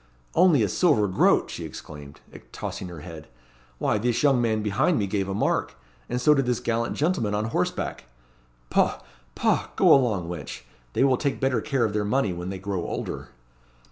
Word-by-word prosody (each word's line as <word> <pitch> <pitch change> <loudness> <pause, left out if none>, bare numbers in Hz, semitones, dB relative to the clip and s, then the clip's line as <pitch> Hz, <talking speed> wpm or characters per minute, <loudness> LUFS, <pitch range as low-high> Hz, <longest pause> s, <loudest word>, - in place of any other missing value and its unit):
"Only 165 -8 +5
a - - +2
silver 110 - +2
groat!" 95 - +3
she - - -6
exclaimed, 75 -1 -10 0.3
tossing 95 - -5
her 85 -4 -9
head. 80 -2 -10 0.5
"Why, 105 - 0
this 120 +3 0
young 135 -4 +4
man 110 -2 0
behind 130 - +1
me 105 - +1
gave 100 0 -2
a 95 - -2
mark; - - 0 0.3
and 125 - -1
so 150 +4 +5
did 135 -3 +1
this 125 -1 +1
gallant 115 0 -1
gentleman 150 - 0
on 105 +1 -1
horseback." - - -2 0.7
"Poh! - - +2 0.4
poh! - - +1
go - - +6
along, 110 -10 +2
wench. 85 -8 -6 0.3
They - - +2
will 135 -2 +4
take 140 +1 -1
better 130 -4 +1
care 135 -3 0
of 105 - -2
their 105 0 0
money 105 -2 +1
when 90 +1 -5
they 95 - -4
grow 95 -1 -3
older." - - -5
110 Hz, 185 wpm, -25 LUFS, 95-135 Hz, 0.7 s, go